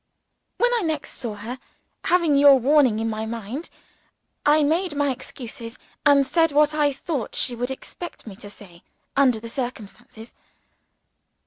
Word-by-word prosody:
When 485 0 +2
I 475 - +1
next 315 -5 -3
saw 230 -4 -5
her, 230 +5 -7 0.5
having 340 -5 +3
your 280 0 +8
warning 265 -3 +4
in 225 +1 -1
my 220 0 -3
mind, 230 +7 -6 0.8
I 300 +1 +5
made 325 +3 0
my 285 -1 +1
excuses, 240 -2 -7 0.3
and 280 -1 +5
said 325 +2 +2
what 300 +1 +3
I 295 -1 +2
thought 275 -2 -4
she 250 - 0
would 245 +2 -3
expect 340 +6 -8
me 210 -4 -9
to 205 - -10
say, 180 -4 -13 0.3
under 260 -5 +3
the 230 - -8
circumstances. 230 -2 -7
265 Hz, 150 wpm, -23 LUFS, 230-300 Hz, 0.8 s, your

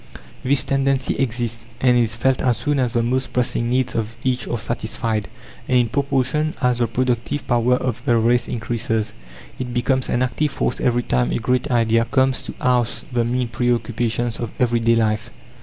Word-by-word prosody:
This 130 +1 +2
tendency 135 -1 +1
exists, 120 -3 -2
and 125 -1 +4
is 115 -2 +2
felt 130 +2 +1
as 125 -3 +2
soon 145 -1 0
as 125 -3 0
the 115 - +2
most 130 +3 -1
pressing 120 -1 +1
needs 125 0 +1
of 115 0 -3
each 125 -1 0
are 120 - -1
satisfied, 110 -1 -2 0.4
and 130 - +3
in 120 -2 +2
proportion 140 +3 0
as 125 -3 +1
the 120 - +2
productive 125 +4 -1
power 120 0 +3
of 125 -1 -2
the 120 -4 +3
race 120 +1 +2
increases. 115 -2 -2 0.5
It 125 -1 -4
becomes 130 +1 +1
an 125 - +1
active 140 +4 0
force - - -2
every 120 -1 +2
time 60 - +1
a - - 0
great 125 +4 0
idea 115 -2 +3
comes 130 +2 +2
to - - -8
oust 125 -2 0
the 120 -1 +2
mean 120 +1 -1
preoccupations 120 -1 -1
of 120 - -3
everyday 115 -1 +3
life. 110 0 0
120 Hz, 180 wpm, -21 LUFS, 115-130 Hz, 0.5 s, and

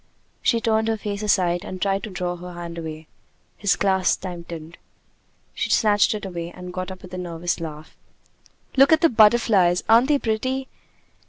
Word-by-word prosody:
She 235 - +2
turned 220 -1 +1
her 225 -1 0
face 205 -1 -4
aside 180 -4 +1
and 185 - -7
tried 195 +1 0
to 215 - -6
draw 180 -2 -3
her 180 +1 -9
hand 170 -1 -7
away. 160 -1 -7 0.5
His 200 -2 +1
clasp 190 -2 +1
tightened. 170 -3 -8 0.7
She - - -2
snatched 210 0 +3
it 210 - -6
away, 170 -3 -5
and 180 0 -9
got 185 0 -4
up 185 -1 -10
with 185 - -12
a 185 - -4
nervous 175 0 -3
laugh. 155 -2 -8 0.8
"Look 275 +2 +6
at 315 - +5
the 330 - +5
butterflies! 210 - +4
Aren't 230 +3 +5
they 295 -1 +3
pretty?" 260 +3 -2
190 Hz, 175 wpm, -23 LUFS, 175-220 Hz, 0.8 s, Look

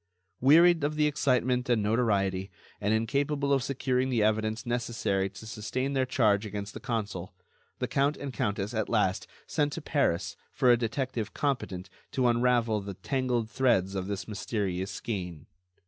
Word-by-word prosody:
Wearied 165 +4 +6
of 150 +1 0
the 150 0 +3
excitement 125 -4 +1
and 115 -4 +3
notoriety, 100 -4 +1 0.3
and 105 +1 +1
incapable 140 +5 +1
of 135 - +3
securing 130 -1 0
the 120 -4 +2
evidence 110 +1 0
necessary 115 -5 -1
to 95 +3 -11
sustain 125 +5 -3
their 130 -1 +1
charge 105 -5 +3
against 100 -1 -5
the - - -7
consul, 100 -7 -4 0.4
the - - -2
count 140 +2 +1
and 140 -2 -6
countess 105 0 -2
at 110 -2 -1
last 95 -4 +1 0.2
sent 150 -2 0
to 165 - -5
Paris 140 - 0 0.2
for 125 - +4
a - - +7
detective 120 -1 -3
competent 110 -10 -2 0.3
to 130 -2 +2
unravel 120 -2 +2
the 100 -1 -7
tangled 125 -1 -1
threads 110 -8 +2
of 95 -1 -3
this 100 -1 -4
mysterious 100 -3 -2
skein. 90 -6 -5
115 Hz, 160 wpm, -29 LUFS, 100-130 Hz, 0.4 s, a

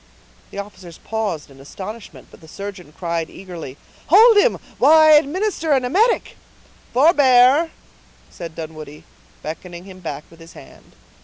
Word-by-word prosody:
The - - -12
officers 185 -4 -9
paused 205 -10 -4
in 135 - -17
astonishment; 200 +10 -10
but - - -17
the 160 - -16
surgeon 190 -2 -9
cried 170 0 -4
eagerly,— 170 -8 -10 0.3
"Hold 440 +8 +7
him, - - +3 0.2
while 300 +5 +6
I 310 0 +6
administer 320 +2 +2
an 260 -2 +1
emetic." 430 - +1 0.5
"Forbear!" 275 +1 +4 0.6
said 165 -2 -9
Dunwoodie, 155 -2 -9 0.4
beckoning 175 +3 -8
him 190 -1 -13
back 150 -4 -6
with 165 - -18
his 165 0 -14
hand. - - -17
200 Hz, 140 wpm, -20 LUFS, -, 0.6 s, Hold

